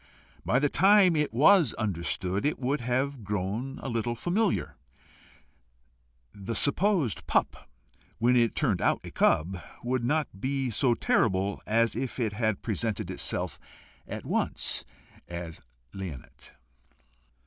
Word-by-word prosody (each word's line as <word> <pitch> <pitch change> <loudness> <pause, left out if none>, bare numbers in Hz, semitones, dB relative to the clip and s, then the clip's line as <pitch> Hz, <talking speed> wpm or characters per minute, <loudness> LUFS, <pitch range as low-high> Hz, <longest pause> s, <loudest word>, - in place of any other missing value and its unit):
By 125 - +2
the 145 +3 +3
time 190 +1 +5
it 150 -1 +1
was 155 - +5
understood, 95 -2 -2
it 150 - 0
would 135 +2 -1
have 130 +1 -1
grown 105 +7 -3
a - - -4
little 120 -1 -1
familiar: 195 - 0 1.6
the 100 +3 -5
supposed 160 - +1
pup - - 0 0.5
when 120 +2 +3
it 120 -2 +3
turned 115 - +1
out - - +2
a - - -8
cub, 90 +3 +1 0.2
would 125 0 -1
not 145 -6 -1
be 135 -1 -1
so 120 +1 +2
terrible 100 -3 +1
as 115 +1 +2
if 130 0 -4
it 110 -4 0
had 110 -2 -1
presented 110 -1 -2
itself - - -3 0.5
at - - -6
once - - -1 0.4
as 85 -2 -7 0.3
leonate. 90 -10 -9
120 Hz, 125 wpm, -28 LUFS, 100-140 Hz, 1.6 s, time